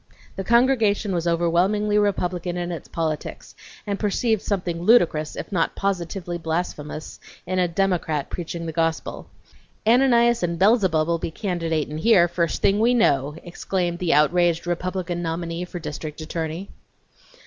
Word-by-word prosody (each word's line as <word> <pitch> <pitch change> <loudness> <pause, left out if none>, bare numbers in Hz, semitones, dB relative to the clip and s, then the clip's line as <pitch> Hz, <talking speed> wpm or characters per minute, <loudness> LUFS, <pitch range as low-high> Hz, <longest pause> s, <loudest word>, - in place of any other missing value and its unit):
The 195 - -4
congregation 230 -4 +3
was 170 -1 -1
overwhelmingly 175 +5 +1
Republican 180 -3 -1
in 175 0 -3
its 170 - -6
politics, 160 -2 -4 0.3
and 200 -1 -3
perceived 220 +1 +1
something 175 -4 -2
ludicrous, 170 -7 +3
if - - -7
not 170 -4 0
positively 175 -2 -3
blasphemous, 160 -2 -4 0.3
in 185 +1 -1
a 180 - +3
Democrat 170 -5 0
preaching 170 -1 -5
the 165 - -3
gospel. 165 0 -2 0.6
("Ananias 235 0 +4
and 170 -1 -1
Beelzebub'll 170 -5 +3
be - - -3
candidatin' 165 -5 -2
here, 190 -3 +5
first 170 -1 -2
thing 200 +1 +3
we 240 +3 +3
know!" 145 - +2
exclaimed 175 0 -3
the 175 -2 0
outraged 170 +3 +3
Republican 175 0 -2
nominee 170 +1 -3
for 180 - -8
district 150 -2 -6
attorney.) 160 +3 -4
175 Hz, 135 wpm, -23 LUFS, 165-200 Hz, 0.6 s, here